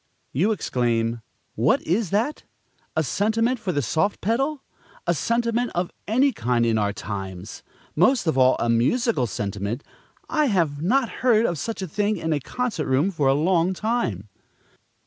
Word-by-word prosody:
You 185 - +2
exclaim: 120 - 0 0.3
"What - - +2
is 185 +4 0
that? 225 - 0 0.5
a 160 - +2
sentiment 225 - +1
for 190 - -2
the 145 -4 -1
soft 160 - 0
pedal! 270 +7 -1 0.4
a - - +2
sentiment 235 +1 0
of 175 0 -1 0.2
any 255 +6 +3
kind 120 - 0
in 115 -1 +2
our 100 -1 +1
times! 95 -1 -6 0.3
most 205 - +3
of 160 - +1
all, 130 -1 +5
a - - -1
musical 130 - +2
sentiment! 100 +4 -3 0.4
I 305 -1 +1
have 165 - +1
not 240 +8 +2
heard 235 -3 +4
of 170 -7 -1
such 220 +4 -4
a - - -3
thing 210 +5 0
in 160 -1 -1
a 145 - 0
concert 230 - -3
room 140 +9 +2
for 150 -6 0
a 135 - +4
long 175 +4 +2
time!" 180 - -1
175 Hz, 165 wpm, -24 LUFS, -, 0.5 s, all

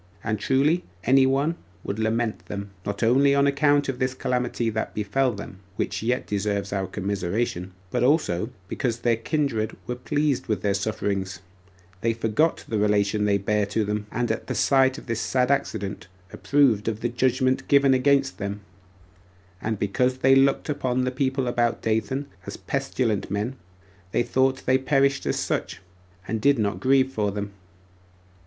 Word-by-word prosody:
And 110 -1 -1
truly, 140 - +2 0.2
any 130 +1 +5
one 140 +5 +1 0.3
would 100 +2 -4
lament 110 0 -1
them, 100 -1 -6 0.2
not 100 +2 -2
only 135 +4 +4
on 140 0 +4
account 145 +1 +3
of 130 -2 -3
this 130 0 0
calamity 125 -2 -1
that 110 0 -3
befell 125 +6 +1
them, 100 -3 -9 0.2
which 100 -1 -2
yet 120 +3 0
deserves 100 -1 -2
our 95 -1 -1
commiseration, 95 -1 -2 0.2
but 125 - 0
also 125 - +2 0.2
because 115 +2 -2
their 120 -1 +3
kindred 115 -4 -1
were 125 - -3
pleased 145 +2 -1
with 110 -3 -1
their 100 -1 +2
sufferings; 100 -2 -2
for 90 - -24 0.6
they 115 0 +1
forgot 115 +8 +1
the 110 - -1
relation 105 0 +2
they 100 -1 +3
bare 105 +1 0
to 105 +1 0
them, 105 0 -3
and 120 0 -1
at 110 - -4
the - - -2
sight 135 -1 +3
of - - -10
this 115 -2 -2
sad 125 0 +1
accident 105 -9 -2 0.3
approved 130 -8 +2
of 110 -1 -2
the 120 - 0
judgment 130 +2 +1
given 140 -1 +5
against 135 +1 +2
them; 100 0 -4 1.0
and 110 -1 -2
because 125 +6 0
they 130 +1 +4
looked 135 0 +3
upon 130 -4 0
the 130 - 0
people 130 0 0
about 120 -1 +1
Dathan 110 +5 0 0.2
as - - -6
pestilent 130 -6 -1
men, 105 +6 -2 0.6
they - - +2
thought 130 +2 +1
they 130 +1 +3
perished 135 0 +1
as - - 0
such, - - -2 0.5
and 110 +2 -2
did 140 +3 +4
not 105 -3 -1
grieve 135 0 +3
for 105 -3 0
them. 100 0 -4
120 Hz, 170 wpm, -25 LUFS, 105-135 Hz, 1.0 s, any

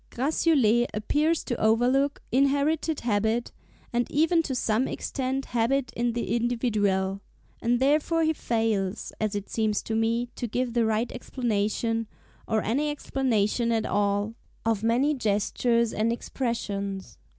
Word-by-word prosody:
Gratiolet 255 -4 +2
appears 300 +9 +1
to 240 - -2
overlook 250 +6 +2
inherited 285 +4 +1
habit, 220 +1 0 0.4
and 240 0 0
even 325 +3 +3
to 275 -5 -3
some 230 +1 +1
extent 265 0 -3
habit 245 +3 +1
in 240 0 0
the 235 0 -1
individual; 205 -5 0 0.4
and 240 +1 +2
therefore 305 +4 +2
he 315 0 +2
fails, 225 -7 -1
as 215 -1 0
it 205 -1 -4
seems 215 -2 0
to 220 - -3
me, 230 +2 +1
to 240 - -3
give 245 +2 -2
the 235 -2 +2
right 220 +2 0
explanation, 225 -2 -1 0.4
or 220 -1 +1
any 280 +8 0
explanation 240 -5 0
at 225 -1 +1
all, 205 +1 0 0.3
of 225 -3 +1
many 245 +7 +2
gestures 230 0 +1
and 220 +2 +1
expressions. 200 - -4
235 Hz, 135 wpm, -26 LUFS, 215-265 Hz, 0.4 s, even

